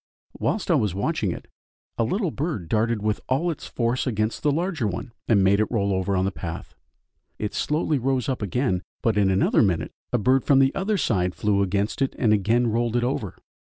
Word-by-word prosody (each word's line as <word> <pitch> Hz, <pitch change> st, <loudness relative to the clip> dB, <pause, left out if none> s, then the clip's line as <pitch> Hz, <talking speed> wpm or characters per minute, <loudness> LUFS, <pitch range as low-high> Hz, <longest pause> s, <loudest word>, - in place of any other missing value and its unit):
Whilst 205 Hz, -4 st, -1 dB
I -, -, +6 dB
was 105 Hz, -, +1 dB
watching 105 Hz, -, 0 dB
it, -, -, -8 dB, 0.5 s
a -, -, +1 dB
little 185 Hz, -, 0 dB
bird 140 Hz, -, -3 dB
darted 110 Hz, +2 st, 0 dB
with 105 Hz, -1 st, 0 dB
all 155 Hz, +7 st, +1 dB
its 155 Hz, -, -7 dB
force 120 Hz, +2 st, -1 dB
against 110 Hz, -2 st, -1 dB
the 150 Hz, -, +2 dB
larger 165 Hz, -, -1 dB
one, 100 Hz, +6 st, -5 dB, 0.2 s
and 100 Hz, -4 st, +4 dB
made 100 Hz, +2 st, +4 dB
it 110 Hz, -, +1 dB
roll 100 Hz, -4 st, 0 dB
over 95 Hz, +1 st, 0 dB
on 95 Hz, 0 st, +1 dB
the 100 Hz, -, 0 dB
path; 85 Hz, -4 st, -7 dB, 0.6 s
it 105 Hz, -, -3 dB
slowly 150 Hz, -1 st, 0 dB
rose 130 Hz, 0 st, 0 dB
up 130 Hz, -4 st, -2 dB
again, 105 Hz, -1 st, 0 dB, 0.2 s
but 115 Hz, -2 st, +2 dB
in 100 Hz, -2 st, +3 dB
another 95 Hz, +1 st, +3 dB
minute 95 Hz, -6 st, +1 dB, 0.2 s
a -, -, +2 dB
bird 130 Hz, +4 st, +3 dB
from 140 Hz, -, +4 dB
the 135 Hz, 0 st, +4 dB
other 200 Hz, +2 st, 0 dB
side 90 Hz, -, 0 dB
flew 100 Hz, -1 st, +1 dB
against 100 Hz, +5 st, -1 dB
it 135 Hz, -, 0 dB
and 110 Hz, -4 st, +3 dB
again 110 Hz, +4 st, +2 dB
rolled 115 Hz, +1 st, 0 dB
it 120 Hz, -, +2 dB
over. 120 Hz, -7 st, -2 dB
115 Hz, 210 wpm, -24 LUFS, 100-135 Hz, 0.6 s, I